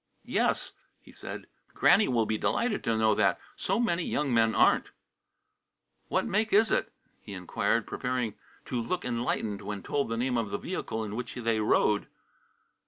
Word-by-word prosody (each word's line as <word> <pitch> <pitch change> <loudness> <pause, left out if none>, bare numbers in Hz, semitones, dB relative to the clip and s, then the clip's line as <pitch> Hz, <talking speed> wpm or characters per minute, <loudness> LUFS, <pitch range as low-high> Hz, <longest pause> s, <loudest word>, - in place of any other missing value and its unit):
"Yes," - - 0 0.3
he - - -17
said. - - -8 0.3
"Granny 220 - +5
will 115 -3 +2
be 110 - -1
delighted 235 -3 0
to 115 -2 +1
know 110 -1 +4
that. 100 -3 +2 0.2
So 195 +4 -1
many 180 -7 +1
young 150 -5 -1
men 115 -1 +3
aren't." - - +4 1.2
"What - - 0
make 215 +3 0
is 215 +2 +4
it?" - - +1 0.3
he 100 - -10
inquired, 90 -2 0
preparing 125 -4 -2 0.3
to 125 - -2
look 180 +10 -3
enlightened 115 -4 -2
when 100 -2 -5
told 140 -4 -1
the 115 - -2
name 125 +1 0
of 110 -3 -2
the - - -2
vehicle 110 0 -4
in 105 -1 -5
which 125 +1 -5
they 115 -2 0
rode. 105 -1 +2
115 Hz, 170 wpm, -29 LUFS, 110-145 Hz, 1.2 s, Granny